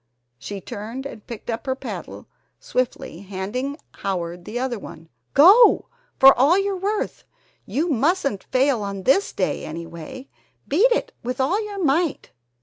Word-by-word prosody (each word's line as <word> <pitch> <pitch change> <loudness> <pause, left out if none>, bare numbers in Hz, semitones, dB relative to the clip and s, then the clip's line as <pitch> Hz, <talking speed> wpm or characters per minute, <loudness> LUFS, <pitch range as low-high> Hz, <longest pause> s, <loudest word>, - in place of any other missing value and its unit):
she 200 +9 -6
turned 225 +8 -7
and 225 -6 -9
picked 235 -3 -8
up 230 +3 -4
her 260 - 0
paddle - - -7 0.3
swiftly, 250 -9 -3
handing 205 +9 -4 0.2
Howard 175 -2 -4
the 225 - -5
other 245 -3 -2
one. 165 -4 -11 0.3
"Go! 395 - +7 0.3
For 270 0 +9
all 285 +8 +4
your 395 0 0
worth! 405 +3 -2 0.4
You 310 +6 0
mustn't 280 - 0
fail 260 -2 +2
on 200 -1 -5
this 385 - +3
day - - -1
anyway! 170 - -8 0.4
Beat 405 - +4
it 480 - 0
with 250 +2 -4
all 355 +12 +1
your 405 -2 -5
might!" 310 +2 0
260 Hz, 145 wpm, -23 LUFS, 200-325 Hz, 0.4 s, For